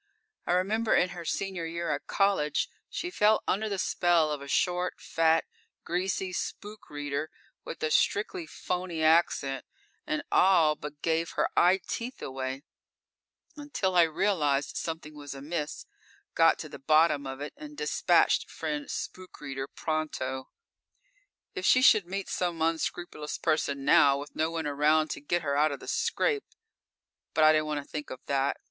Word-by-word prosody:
I - - +2
remember 215 +5 +2
in 180 - +3
her 175 -1 -7
senior 185 -2 -2
year 170 +1 -3
at - - -3
college 195 -7 +1 0.2
she 355 - -4
fell 215 -8 +3
under 215 +3 0
the 200 - -2
spell 175 -4 +2
of 145 -2 -3
a 140 - -8
short, 180 +4 0
fat, 165 0 +2 0.4
greasy 185 +1 -2
spook 210 +3 -6
reader 145 +1 -3 0.3
with - - -7
a 155 - 0
strictly 190 -4 +1
phony 180 -1 -3
accent 155 -4 +2 0.4
and 305 -1 -1
all 170 -5 +5
but 150 0 -9
gave 165 0 0
her - - +1
eye 180 +2 +5
teeth 245 +2 -4
away, 130 +1 -5 0.9
until 285 -11 -2
I 175 - +7
realized 160 -4 +1
something 160 -2 -4
was 145 -1 -8
amiss, 150 +2 -4 0.5
got - - +5
to - - -6
the - - -10
bottom 155 0 +3
of 135 0 -6
it, 145 - -6
and 300 0 -11
dispatched 450 - +2
friend 295 -1 -4
spook 185 0 -6
reader 135 -1 -5
pronto. 140 -5 -3 1.0
If 385 -3 -5
she 255 - +5
should 215 -9 +6
meet 195 +2 -4
some 175 -2 -2
unscrupulous 160 -1 -2
person 140 -4 0
now, 145 -2 +6
with 145 +1 -8
no 160 +1 +1
one 165 -1 -3
around 150 +2 +2
to - - -5
get 175 +4 -1
her 140 -2 0
out 150 +1 +3
of 140 - -5
the - - -12
scrape 430 -4 0 0.9
but 155 - +4
I 155 - +8
didn't 155 0 +1
want 150 -1 -2
to - - -25
think 150 -1 -6
of 130 - -7
that. 140 0 0
160 Hz, 165 wpm, -29 LUFS, 145-185 Hz, 1.0 s, I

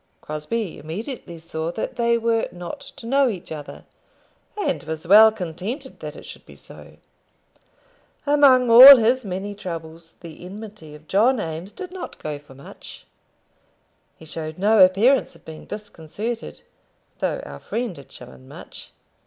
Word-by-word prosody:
Crosbie 160 +6 -5
immediately 175 - -7
saw 160 0 -5
that 220 - -5
they 235 0 +1
were 230 0 0
not 180 +10 -8
to 280 -4 -13
know 270 +2 +2
each 185 -5 -7
other, 150 -2 -9 0.7
and 175 - -1
was 160 +2 -6
well 215 +5 +8
contented 210 - -6
that - - -8
it - - -12
should - - -12
be - - -16
so. - - -15 1.3
Among 275 -4 +4
all 260 +4 +12
his 245 +3 +1
many 195 +1 -5
troubles, 165 -4 -8
the 170 -1 -11
enmity 195 -5 -10
of 155 +1 -17
John 230 - +2
Eames 165 +1 -6
did 370 - -9
not 370 -1 -8
go 150 -1 -6
for 145 -2 -18
much. 140 - -13 1.1
He 160 - -14
showed 155 0 -7
no 210 +3 +3
appearance 210 +9 +3
of - - -21
being 160 -1 -11
disconcerted, 210 - -7 0.6
though - - -2
our 70 0 -10
friend 230 -3 -4
had 140 -4 -15
shown 65 0 -14
much. - - -12
195 Hz, 150 wpm, -22 LUFS, 160-235 Hz, 1.3 s, all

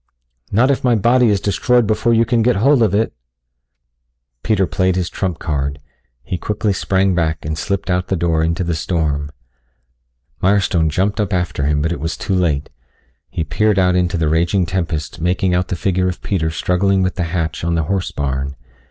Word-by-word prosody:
"Not 120 +7 +3
if 135 - -1
my 125 -2 +3
body 120 +3 +3
is 100 -2 +2
destroyed 120 +4 +2
before 110 +2 +1
you 115 0 +4
can 115 0 +1
get 125 +2 +3
hold 130 +6 +3
of 105 -3 +3
it." 110 +2 0 1.3
Peter 105 -4 +1
played 95 +1 0
his 90 -2 -2
trump 90 -4 -2
card. 70 -3 -2 0.5
He 90 - -4
quickly 105 +1 -1
sprang 95 0 +1
back 80 -4 -1
and 80 0 -2
slipped 100 +4 -3
out 90 -1 0
the 95 - 0
door 80 -2 +1
into 85 +3 0
the 85 -1 -1
storm. 75 -3 -1 1.1
Mirestone 95 -4 +2
jumped 100 +7 0
up 105 - -2
after 90 -6 -1
him, 75 -1 +1
but 80 - 0
it 85 - -3
was 80 +3 -3
too - - -2
late. 80 -6 0 0.6
He 80 - -2
peered 105 +7 +1
out 90 -1 +3
into 90 -1 +1
the 80 -2 0
raging 85 +4 +2
tempest 85 -3 -3
making 90 +2 +1
out 90 +1 +1
the - - -2
figure 90 +1 0
of 90 - -4
Peter 80 -5 0
struggling 95 +4 +1
with 90 - 0
the 90 - -2
hatch 80 -2 -3
on 85 0 0
the 80 - +1
horse 95 +3 -1
barn. 70 -1 -3
90 Hz, 195 wpm, -18 LUFS, 80-100 Hz, 1.3 s, you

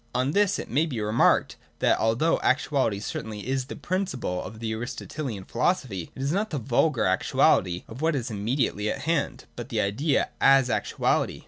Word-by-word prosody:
On 130 +2 +1
this 200 +3 +2
it - - -5
may 150 +6 +2
be 130 -7 -4
remarked: 105 +2 +2 0.2
that - - +2
although 115 +9 +2
actuality 130 -6 +1
certainly 105 0 -5
is 130 -1 -1
the 140 - -7
principle 175 - -2
of 110 - -8
the 110 -1 -3
Aristotelian 120 -1 -5
philosophy, 115 - -1
it 135 - -5
is 140 - 0
not 205 +5 0
the 150 - -3
vulgar 130 +2 +1
actuality 90 -1 +2
of 115 +5 -9
what 160 -1 +2
is 125 -3 -3
imme 110 +5 -2
diately 105 -6 0
at 135 - -5
hand, 140 -4 -1
but 120 +1 -7
the 115 -5 -1
idea 110 +10 +1 0.2
as 135 -2 +4
actuality. 105 -1 0
125 Hz, 185 wpm, -26 LUFS, 110-145 Hz, 0.2 s, as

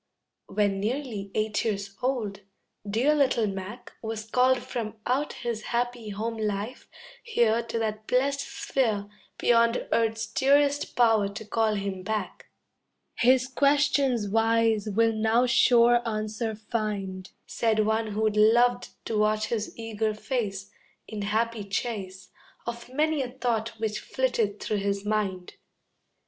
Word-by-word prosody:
When 200 -1 0
nearly 220 -2 -3
eight 215 -1 0
years 200 -2 -3
old, 235 -6 -1 0.5
dear 245 +9 +3
little 270 -6 +2
Mac 200 +4 -6
Was 220 -1 -4
called 255 +3 +3
from 225 -2 -4
out 275 +4 0
his 235 -3 -4
happy 240 -2 -2
home 225 +3 -3
life 210 +3 -3 0.3
here 235 - +2
To 230 0 -4
that 215 -1 -3
blest 275 +2 +1
sphere 255 -6 -1 0.3
Beyond 235 0 +3
earth's 225 0 +1
dearest 280 +5 +2
power 225 -4 +4
to 215 +2 -8
call 220 0 +1
him 195 -2 -3
back. 210 0 -4 0.7
"His 255 +1 +4
questions 275 -4 +2
wise 225 0 +2
will 225 +2 +2
now 220 +3 +2
sure 240 -1 +5
answer 215 +1 -3
find," 205 -4 -4 0.2
Said 220 -2 +1
one 220 +1 +1
who'd 215 0 +1
loved 240 +3 +4 0.2
to 220 -2 -1
watch 215 0 +1
his 220 -2 -2
eager 220 -1 -2
face, 210 -5 -3 0.4
In 215 -1 -5
happy 220 +2 -1
chase 195 -2 -4 0.4
Of 235 +1 -6
many 305 +2 +1
a 255 - -3
thought 230 -3 -2
which 215 -1 -2
flitted 230 -6 -1
through 215 - -2
his 200 0 -2
mind. 200 -4 -2
225 Hz, 130 wpm, -27 LUFS, 210-245 Hz, 0.7 s, sure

